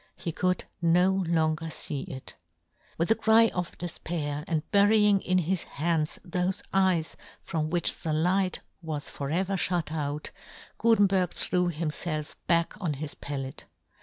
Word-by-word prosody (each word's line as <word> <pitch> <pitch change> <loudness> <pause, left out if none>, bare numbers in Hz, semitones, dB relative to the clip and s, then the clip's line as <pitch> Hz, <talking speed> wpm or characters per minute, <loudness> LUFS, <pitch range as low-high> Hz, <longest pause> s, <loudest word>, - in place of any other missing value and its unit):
He 170 - -4
could 180 +3 0 0.2
no 175 +3 +4 0.2
longer 160 -1 +1
fee 145 -3 -4
it! 130 -1 -8 0.6
With 170 +6 +1
a - - +6
cry 225 0 +5
of 180 -1 -4
defpair, 155 -4 -3
and 160 -4 0
bury 205 +2 +5
yohn 210 -2 +5
Gutenberg. - - -13
99 - - -8
ing 185 0 +4
in 175 - -2
his 185 +1 0
hands 155 0 -1
thofe 180 +1 -1
eyes 185 -4 +2 0.2
from 155 -1 -3
which 175 +1 +4
the 165 - -3
Hght 180 +4 +1 0.2
was 155 -3 -4
for 140 -1 -5
ever 185 +5 0
fhut 175 -3 0
out, 150 -1 -3 0.5
Gutenberg 195 -6 +3
threw 180 -1 0
himfelf 155 -1 -3
back 170 -1 +2
on 160 -6 -1
his 145 +1 -5
pallet. 135 -2 -6
170 Hz, 165 wpm, -28 LUFS, 155-185 Hz, 0.6 s, a